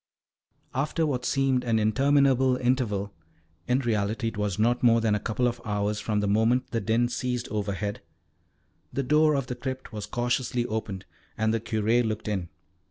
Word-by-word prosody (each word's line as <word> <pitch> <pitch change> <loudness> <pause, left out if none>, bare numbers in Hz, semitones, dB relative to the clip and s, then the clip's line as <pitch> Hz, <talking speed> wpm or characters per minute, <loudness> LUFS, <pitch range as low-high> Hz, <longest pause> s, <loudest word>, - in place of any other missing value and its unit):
After 150 +4 0
what 125 -5 -2
seemed 135 -2 +1
an 115 -2 +1
interminable 130 +3 +3
interval 115 -6 0 0.5
in 125 +2 +2
reality 110 -1 0
it 115 - -11
was 105 -2 -1
not 120 +3 +2
more 115 -1 +5
than 110 -2 +1
a 105 - +1
couple 120 +4 0
of 120 0 -3
hours 105 0 -1
from 105 -1 -1
the 105 - 0
moment 115 +5 +2
the 115 - -1
din 115 +4 +2
ceased 125 0 -2
overhead 100 -1 -3 0.9
the 140 - -1
door 150 +3 +4
of 135 -2 -1
the 125 - -4
crypt 130 0 -6
was 105 -1 -5
cautiously 120 +1 -1
opened, 110 -4 -4 0.3
and 110 0 +1
the 115 - +1
Curé 110 +2 +1
looked 110 -2 -3
in. 95 -5 -2
115 Hz, 170 wpm, -27 LUFS, 105-125 Hz, 0.9 s, more